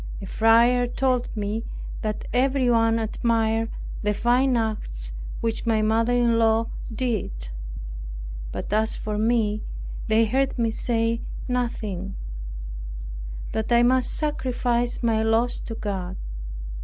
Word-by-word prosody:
A -, -, -6 dB
friar 235 Hz, +2 st, +5 dB
told 250 Hz, 0 st, +1 dB
me, 210 Hz, +2 st, -1 dB, 0.4 s
that 215 Hz, -1 st, -2 dB
everyone 245 Hz, -3 st, +3 dB
admired 225 Hz, 0 st, +1 dB, 0.3 s
the 210 Hz, 0 st, +1 dB
fine 245 Hz, +3 st, +3 dB
acts -, -, -2 dB, 0.3 s
which 230 Hz, 0 st, -1 dB
my 220 Hz, -1 st, +3 dB
mother 225 Hz, +2 st, +3 dB
in 240 Hz, -1 st, +3 dB
law 225 Hz, 0 st, +3 dB, 0.2 s
did; 215 Hz, -, -2 dB, 1.0 s
but 195 Hz, -, -4 dB
as 220 Hz, +1 st, +2 dB
for 210 Hz, -1 st, -3 dB
me, 215 Hz, -2 st, +2 dB, 0.5 s
they 220 Hz, +1 st, +4 dB
heard 265 Hz, +5 st, +1 dB
me 230 Hz, -2 st, +2 dB
say 230 Hz, 0 st, +1 dB, 0.3 s
nothing; 215 Hz, -6 st, -2 dB, 1.4 s
that 220 Hz, +2 st, -2 dB
I 235 Hz, 0 st, +6 dB
must 255 Hz, +1 st, +4 dB
sacrifice 245 Hz, -5 st, 0 dB
my 225 Hz, -2 st, +3 dB
loss 225 Hz, +2 st, +2 dB
to 225 Hz, -, -6 dB
God. 190 Hz, -4 st, -3 dB
225 Hz, 120 wpm, -25 LUFS, 220-245 Hz, 1.4 s, I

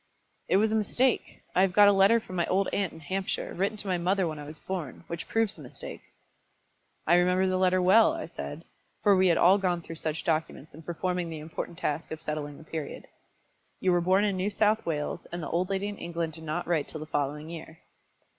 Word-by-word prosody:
"It -, -, +4 dB
was 215 Hz, +2 st, +3 dB
a -, -, +2 dB
mistake. 240 Hz, +4 st, 0 dB
I 185 Hz, -, +4 dB
have 190 Hz, -2 st, +3 dB
got 205 Hz, +1 st, +7 dB
a -, -, +8 dB
letter 200 Hz, +4 st, +5 dB
from 185 Hz, -4 st, -9 dB
my 170 Hz, -1 st, +1 dB
old 195 Hz, +1 st, +2 dB
aunt 195 Hz, -4 st, 0 dB
in 160 Hz, -, -12 dB
Hampshire, 190 Hz, +6 st, -3 dB
written 200 Hz, +4 st, -1 dB
to 205 Hz, -, -5 dB
my 180 Hz, -2 st, 0 dB
mother 185 Hz, +1 st, +1 dB
when 155 Hz, -2 st, -5 dB
I 145 Hz, -, -7 dB
was 155 Hz, +2 st, -9 dB
born, 175 Hz, -8 st, -5 dB
which 170 Hz, -1 st, -6 dB
proves 225 Hz, -2 st, +1 dB
the 155 Hz, -, -12 dB
mistake." 125 Hz, -, -8 dB, 1.0 s
"I 170 Hz, -, +4 dB
remember 180 Hz, +1 st, +3 dB
the 185 Hz, 0 st, +1 dB
letter 185 Hz, 0 st, +3 dB
well," 200 Hz, +8 st, +6 dB
I 325 Hz, -1 st, -4 dB
said, -, -, -7 dB, 0.4 s
for 205 Hz, -2 st, +6 dB
we 185 Hz, 0 st, +4 dB
had 170 Hz, -, +4 dB
all 190 Hz, +3 st, +6 dB
gone 175 Hz, -3 st, 0 dB
through 165 Hz, -, -8 dB
such 155 Hz, -1 st, -3 dB
documents 155 Hz, -2 st, -2 dB
in 160 Hz, -, -11 dB
performing 175 Hz, +1 st, -2 dB
the 160 Hz, -, -5 dB
important 160 Hz, +2 st, -6 dB
task 150 Hz, -2 st, -2 dB
of 160 Hz, -, -5 dB
settling 150 Hz, -2 st, -4 dB
the -, -, -13 dB
Period. 155 Hz, -2 st, -6 dB, 0.7 s
"You 185 Hz, -, +2 dB
were 175 Hz, 0 st, +3 dB
born 190 Hz, +4 st, +3 dB
in 200 Hz, -2 st, 0 dB
New 190 Hz, +3 st, 0 dB
South 210 Hz, 0 st, +1 dB
Wales, 155 Hz, +1 st, -3 dB
and 175 Hz, -1 st, -4 dB
the -, -, -4 dB
old 180 Hz, +3 st, 0 dB
lady 195 Hz, +1 st, -1 dB
in 205 Hz, -1 st, -6 dB
England 170 Hz, -1 st, -3 dB
did 160 Hz, +1 st, -10 dB
not 155 Hz, +3 st, -2 dB
write 165 Hz, -4 st, 0 dB
till 155 Hz, -, -6 dB
the 155 Hz, -, -6 dB
following 150 Hz, 0 st, -2 dB
year." 160 Hz, -1 st, -9 dB
175 Hz, 230 wpm, -28 LUFS, 160-195 Hz, 1.0 s, a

